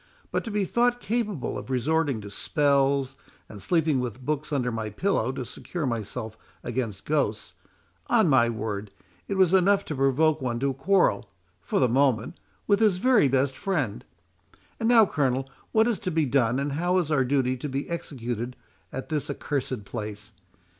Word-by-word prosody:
But - - -1
to - - -4
be 205 -2 0
thought 245 +5 +2
capable 215 - -2
of - - -10
resorting 140 -1 0
to 100 -1 -9
spells, 140 +1 +1 0.3
and 105 -2 -11
sleeping 160 -5 +2
with 125 0 -5
books 150 0 -2
under 125 -4 0
my 110 -2 -3
pillow 130 - 0
to 130 -1 -4
secure 155 +6 -5
myself 110 -1 -4 0.3
against 115 -5 -3
ghosts,—on 145 +2 -1
my 130 -5 +4
word, 105 -2 -4 0.4
it 200 - -2
was 190 -2 +4
enough 195 +1 +4
to 150 - -4
provoke 145 +3 +2
one 120 -2 -2
to 140 0 +1
quarrel, 135 - +2 0.3
for - - -2
the 130 - +4
moment, 125 -2 +1 0.3
with 205 -1 +3
his 210 -5 +3
very 245 - +4
best 135 0 +1
friend.—And 100 - -5
now, 230 -3 +7
Colonel, 135 -6 0 0.2
what 220 +1 +4
is 235 -4 0
to - - -3
be 160 -3 +1
done, 125 -2 +2
and 140 +1 -1
how 175 +6 +1
is 170 -4 0
our 140 -3 +3
duty 130 -1 +1
to 145 +4 -5
be 135 +2 -3
executed 125 -7 -4 0.4
at 135 - -6
this 150 -3 -2
accursed 130 -6 -3
place? 105 -1 -6
135 Hz, 165 wpm, -26 LUFS, 120-165 Hz, 0.4 s, now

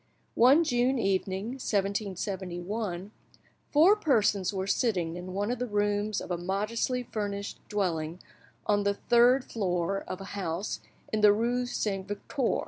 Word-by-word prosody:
One 265 +8 +6
June 250 -2 +2
evening, 195 -1 0
1771, 195 -3 -3 0.6
four 330 +8 +6
persons 215 - +2
were 190 -1 -2
sitting 190 -6 0
in 180 +1 -7
one 205 +3 0
of 245 - -3
the 250 - -1
rooms 205 0 0
of - - -7
a 175 - -1
modestly 215 +7 -1
furnished, 205 -3 -4
dwelling 170 -6 -1 0.5
on 205 -1 +2
the 200 0 +1
third 245 +4 +4
floor 190 -2 -1
of 185 - -5
a - - -7
house 190 0 -3 0.3
in 215 - +1
the 210 -1 +8
rue 240 +4 0
Saint 195 -5 -2
Victor. 205 +5 -1
205 Hz, 140 wpm, -29 LUFS, 190-235 Hz, 0.6 s, the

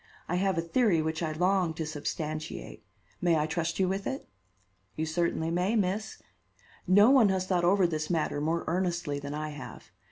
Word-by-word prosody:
I 175 - 0
have 190 -1 +1
a 165 - +1
theory 190 0 +2
which 160 +1 -2
I 160 -2 -1
long 180 0 +1
to 160 - -3
substantiate. 155 +1 -5 0.4
May 170 -2 +3
I 150 - +1
trust 165 +1 -2
you 190 - +2
with 195 +1 -2
it?" 270 +1 -4 0.7
"You 160 - -1
certainly 165 0 -1
may, 180 +6 +1
Miss. 210 +1 -1 0.7
No 205 +6 +6
one 250 -7 +6
has 190 -1 0
thought 180 -2 +1
over 190 +2 +4
this 155 -2 -2
matter 155 -3 0
more 165 +2 0
earnestly 170 -4 -1
than 145 +1 -5
I 155 0 -3
have. 150 0 -10
170 Hz, 185 wpm, -29 LUFS, 155-190 Hz, 0.7 s, No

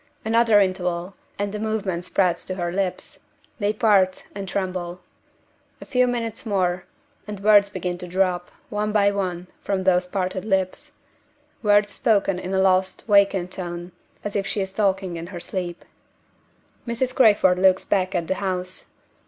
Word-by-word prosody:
Another 225 -1 +4
interval, 180 -1 -1 0.2
and 205 0 -2
the 210 - -3
movement 205 -5 -2
spreads 180 -2 +1
to 185 - -4
her 175 -2 -2
lips: 190 0 -3 0.4
they 205 -1 +1
part 205 -4 +2
and 195 -1 -6
tremble. 180 -2 -3 0.8
A - - -10
few 250 -2 +2
minutes 230 -2 -3
more, 185 -5 0 0.4
and 210 -2 -6
words 205 0 +5
begin 180 -2 -4
to 180 - -6
drop, 180 -1 0 0.2
one 210 0 -1
by 200 -1 +4
one, 185 -3 -3 0.2
from 195 -2 -1
those 180 -1 +3
parted 185 0 -2
lips 190 -3 -1 0.7
words 205 -1 +4
spoken 200 -4 +1
in 185 - -5
a 190 - +1
lost, 190 0 +2
vacant 200 -3 +3
tone, 175 -1 -6 0.3
as 205 - -5
if 200 -1 0
she 205 - -1
is 190 0 -4
talking 190 -4 0
in 165 +1 -6
her 180 -2 -7
sleep. 175 -1 -5 1.0
Mrs. 245 +2 -1
Crayford 205 -7 +5
looks 190 0 +4
back 190 -1 0
at 170 -2 -1
the - - +1
house. 185 -1 -3
190 Hz, 160 wpm, -23 LUFS, 180-205 Hz, 1.0 s, words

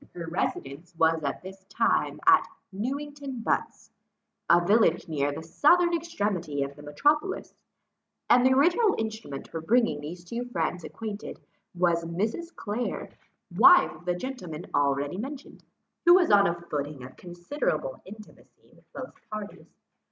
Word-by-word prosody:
Her 170 -1 -5
residence 165 -1 -4
was 160 -1 +2
at 140 +4 -3
that 190 +1 -12
time - - +1
at - - +6 0.2
Newington 275 +4 -5
Butts, - - -2 0.6
a 170 - +7
village 200 -3 +3
near 145 -3 0
the 150 - -6
southern 345 - +3
extremity 205 - -2
of 140 0 -6
the 145 - -13
metropolis; 295 - 0 0.7
and 245 - +5
the 260 - +5
original 350 - +3
instrument 220 -11 -5
for 165 - -6
bringing 225 -4 +2
these 170 +4 -8
two 235 +6 -4
friends 175 -6 -2
acquainted, 215 -2 -7 0.4
was 170 -1 +2
Mrs. 215 - -3
Clare, 225 +4 -4 0.5
wife 360 0 +7
of 175 - -15
the 180 -1 0
gentleman 180 -8 -6
already 145 +4 0
mentioned, 275 +4 -8 0.4
who 345 - +10
was 365 - +4
on 200 -1 +6
a 170 0 -2
footing 145 -5 -5
of 130 - -11
considerable 290 - -3
intimacy 210 +2 -15
with - - -25
both 260 -2 -7 0.2
parties. 215 -1 -7
195 Hz, 145 wpm, -27 LUFS, 165-260 Hz, 0.7 s, who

